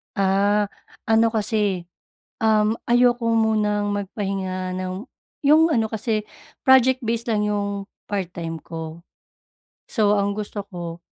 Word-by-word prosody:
Ah, 200 Hz, +1 st, +2 dB, 0.4 s
ano 225 Hz, +1 st, +4 dB
kasi, 205 Hz, -5 st, 0 dB, 0.5 s
um, 215 Hz, 0 st, +3 dB, 0.2 s
ayoko 245 Hz, 0 st, +4 dB
munang 210 Hz, -2 st, +1 dB
magpahinga 190 Hz, -2 st, -3 dB
ng 185 Hz, +5 st, -4 dB, 0.4 s
yung 315 Hz, +3 st, +6 dB
ano 230 Hz, -7 st, +2 dB
kasi 215 Hz, -1 st, -2 dB, 0.4 s
project-based 250 Hz, -3 st, +4 dB
lang 210 Hz, -1 st, +1 dB
yung 200 Hz, -1 st, -2 dB, 0.2 s
part-time 170 Hz, -4 st, -3 dB
ko. 165 Hz, +1 st, -8 dB, 0.8 s
So 210 Hz, -3 st, +2 dB
ang 200 Hz, 0 st, +1 dB
gusto 205 Hz, 0 st, -4 dB
ko, 175 Hz, -3 st, -8 dB
205 Hz, 105 wpm, -23 LUFS, 190-225 Hz, 0.8 s, yung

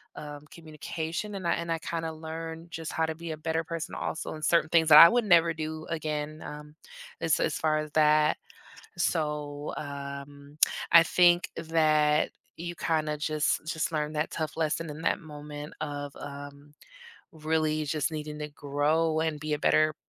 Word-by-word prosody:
um, 145 Hz, 0 st, -8 dB
communication, 165 Hz, +5 st, -5 dB
and 190 Hz, -, -6 dB
I -, -, +3 dB
and 170 Hz, -, -5 dB
I 165 Hz, -, 0 dB
kinda 165 Hz, 0 st, -3 dB
learned 160 Hz, +1 st, -7 dB
just 165 Hz, 0 st, -5 dB
how 160 Hz, -, +1 dB
to 160 Hz, 0 st, -4 dB
be 165 Hz, 0 st, -6 dB
a 155 Hz, -, -5 dB
better 160 Hz, +1 st, -1 dB
person 165 Hz, 0 st, -5 dB
also, -, -, -4 dB
and 155 Hz, 0 st, -4 dB
certain 170 Hz, -2 st, +3 dB
things 165 Hz, -1 st, +4 dB
that 150 Hz, -, +10 dB
I 165 Hz, -, +12 dB
would 240 Hz, -1 st, +2 dB
never 170 Hz, -3 st, +5 dB
do 155 Hz, 0 st, -5 dB
again, 155 Hz, -1 st, -3 dB
um, 150 Hz, 0 st, -9 dB, 0.5 s
as -, -, +2 dB
as -, -, 0 dB
far 155 Hz, -1 st, +1 dB
as 155 Hz, 0 st, -5 dB
that. 150 Hz, 0 st, +4 dB, 0.6 s
So, 150 Hz, -3 st, -1 dB
um, 140 Hz, 0 st, -8 dB, 0.3 s
I 170 Hz, -, +10 dB
think 175 Hz, +1 st, +4 dB
that 155 Hz, -2 st, +2 dB, 0.3 s
you 175 Hz, +1 st, -5 dB
kinda 155 Hz, -1 st, 0 dB
just 150 Hz, 0 st, 0 dB
just 160 Hz, 0 st, -1 dB
learn 150 Hz, -1 st, -1 dB
that 150 Hz, +1 st, -1 dB
tough 155 Hz, -2 st, -3 dB
lesson 160 Hz, 0 st, -1 dB
in 150 Hz, +2 st, -8 dB
that -, -, +1 dB
moment 150 Hz, -1 st, -9 dB
of, 145 Hz, -2 st, -5 dB
um, 145 Hz, +1 st, -9 dB, 0.6 s
really 155 Hz, -1 st, 0 dB
just 150 Hz, +1 st, -1 dB
needing 150 Hz, -1 st, -5 dB
to 150 Hz, 0 st, -4 dB
grow 155 Hz, +3 st, 0 dB
and 160 Hz, -2 st, -1 dB
be 155 Hz, +1 st, -3 dB
a -, -, -3 dB
better 155 Hz, +1 st, +3 dB
155 Hz, 175 wpm, -28 LUFS, 150-165 Hz, 0.6 s, I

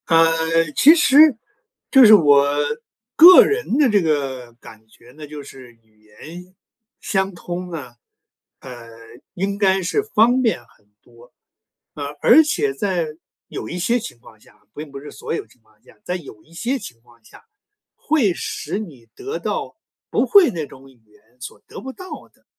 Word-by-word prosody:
呃， 165 Hz, -1 st, +4 dB, 0.5 s
其 310 Hz, +4 st, +6 dB
实 300 Hz, -4 st, +5 dB, 0.5 s
就 265 Hz, -3 st, +7 dB
是 215 Hz, -, +8 dB
我 145 Hz, -7 st, +5 dB, 0.7 s
个 355 Hz, +3 st, +9 dB
人 425 Hz, -, -2 dB
的 290 Hz, -4 st, +3 dB
这 205 Hz, -2 st, +2 dB
个 135 Hz, -6 st, -3 dB
感 110 Hz, -2 st, -17 dB
觉 115 Hz, +2 st, -21 dB
呢 150 Hz, +3 st, -12 dB
就 150 Hz, -1 st, -10 dB
是 130 Hz, -3 st, -14 dB
语 110 Hz, -2 st, -34 dB
言 170 Hz, -, -14 dB, 0.4 s
相 190 Hz, -1 st, -2 dB
通 180 Hz, +1 st, -7 dB
呢， 135 Hz, -7 st, -9 dB, 0.6 s
呃， 120 Hz, -3 st, -12 dB, 0.5 s
应 200 Hz, +2 st, -3 dB
该 190 Hz, -2 st, +1 dB
是 185 Hz, -, -1 dB
方 245 Hz, -, +2 dB
便 225 Hz, -, 0 dB
很 105 Hz, -2 st, -30 dB
多， 120 Hz, 0 st, -21 dB, 0.6 s
啊。 145 Hz, -, -7 dB, 0.2 s
而 305 Hz, +7 st, +6 dB
且 410 Hz, +7 st, -2 dB
在 185 Hz, -, -2 dB, 0.4 s
有 -, -, -8 dB
一 175 Hz, -, -6 dB
些 235 Hz, +7 st, 0 dB
情 220 Hz, -, -10 dB
况 110 Hz, -2 st, -19 dB
下 -, -, -25 dB, 0.2 s
并 150 Hz, -1 st, -9 dB
不 140 Hz, -, -9 dB
是 145 Hz, -, -12 dB
所 -, -, -7 dB
有 -, -, -4 dB
情 125 Hz, -, -27 dB
况 110 Hz, -1 st, -32 dB
下， -, -, -22 dB
在 180 Hz, -, -4 dB
有 140 Hz, -11 st, -11 dB
一 165 Hz, -, -24 dB
些 245 Hz, +10 st, -3 dB
情 125 Hz, -, -12 dB
况 120 Hz, -1 st, -25 dB
下， -, -, -19 dB, 0.5 s
会 275 Hz, -, 0 dB
使 200 Hz, -, -5 dB
你 140 Hz, -, -11 dB
得 420 Hz, +3 st, -6 dB
到 -, -, -5 dB, 0.3 s
不 -, -, 0 dB
会 400 Hz, -6 st, +5 dB
那 160 Hz, -3 st, -5 dB
种 135 Hz, 0 st, -16 dB
语 130 Hz, -3 st, -24 dB
言 105 Hz, 0 st, -27 dB, 0.2 s
所 115 Hz, -, -10 dB
得 -, -, -10 dB
不 265 Hz, 0 st, -9 dB
到 370 Hz, +4 st, -11 dB
的， -, -, -34 dB
170 Hz, 185 characters per minute, -19 LUFS, -, 0.7 s, 个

